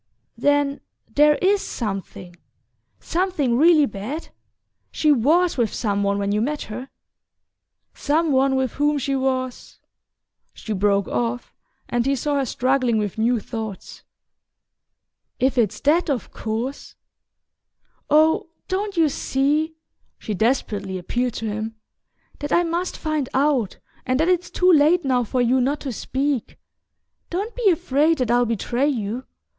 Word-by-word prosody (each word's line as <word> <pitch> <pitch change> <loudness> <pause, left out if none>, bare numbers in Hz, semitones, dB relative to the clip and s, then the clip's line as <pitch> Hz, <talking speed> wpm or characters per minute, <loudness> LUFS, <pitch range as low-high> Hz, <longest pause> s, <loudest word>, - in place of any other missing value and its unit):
"Then 285 +3 +1 0.3
there 295 +1 +5
IS 395 +1 +3
something 195 -5 -5 0.6
something 335 -9 0
really 310 +2 +5
bad? 245 +8 -6 0.6
She 305 - +2
WAS 310 +7 +3
with 230 -4 +1
some 205 -3 -1
one 200 0 +1
when 200 0 -1
you 210 +1 +1
met 295 +5 -2
her? 250 +5 -7 1.0
Some 310 +2 0
one 265 0 +3
with 260 -3 0
whom 295 +1 +1
she 275 0 -1
was 260 -1 -2 0.4
" - - -52
She 220 - -5
broke 200 0 +1
off, 240 +1 -2 0.3
and 240 +1 0
he 275 - +2
saw 290 +2 -1
her 270 -2 0
struggling 255 -2 +1
with 210 0 -2
new 235 +1 +2
thoughts. 220 -3 -7 1.4
"If 260 +1 +2
it's 215 -4 +1
THAT, 320 +4 +2
of 265 -6 -2
course...Oh, 285 +6 -3 0.2
don't 390 0 -2
you 325 -2 +5
see," 295 +3 0 0.4
she 215 - -5
desperately 205 -3 -1
appealed 240 +7 -2
to 225 - -4
him, 220 +1 -4 0.6
"that 290 - -5
I 345 - +4
must 345 +2 -2
find 310 -4 -2
out, 270 -6 +1 0.3
and 255 +1 +1
that 325 +3 +2
it's 360 -1 +1
too 365 0 +3
late 315 +2 +4
now 255 -2 +2
for 245 +2 0
you 255 +2 +3
not 280 +4 0
to 275 - -4
speak? 265 +2 -2 0.7
Don't 400 +6 -3
be 475 -5 +3
afraid 320 -2 +2
that 250 -3 0
I'll 245 0 +3
betray 235 +4 0
you... 240 -2 -2
265 Hz, 140 wpm, -22 LUFS, 230-300 Hz, 1.4 s, there